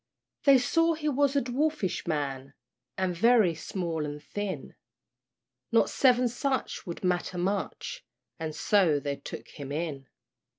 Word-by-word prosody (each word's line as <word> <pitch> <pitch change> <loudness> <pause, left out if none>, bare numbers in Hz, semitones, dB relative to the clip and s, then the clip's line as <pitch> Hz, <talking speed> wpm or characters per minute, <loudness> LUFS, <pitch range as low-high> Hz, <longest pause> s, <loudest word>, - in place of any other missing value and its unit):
They 275 -2 +8
saw 330 +6 +2
he 305 -1 -1
was 285 0 +2
a 280 - +4
dwarfish 260 - -1
man, 140 -3 -3 0.4
And 185 -2 0
very 220 -2 +5
small 165 0 -3
and 150 0 -5
thin; 205 +2 -5 1.0
Not - - +4
seven 250 -2 +4
such 260 -3 -2
would 170 - -6
matter 180 0 0
much, 200 - -2 0.4
And 160 -1 -4
so 180 -8 +3
they 140 0 -3
took - - -8
him 140 -2 -8
in. 145 -3 -3
185 Hz, 135 wpm, -28 LUFS, 155-255 Hz, 1.0 s, They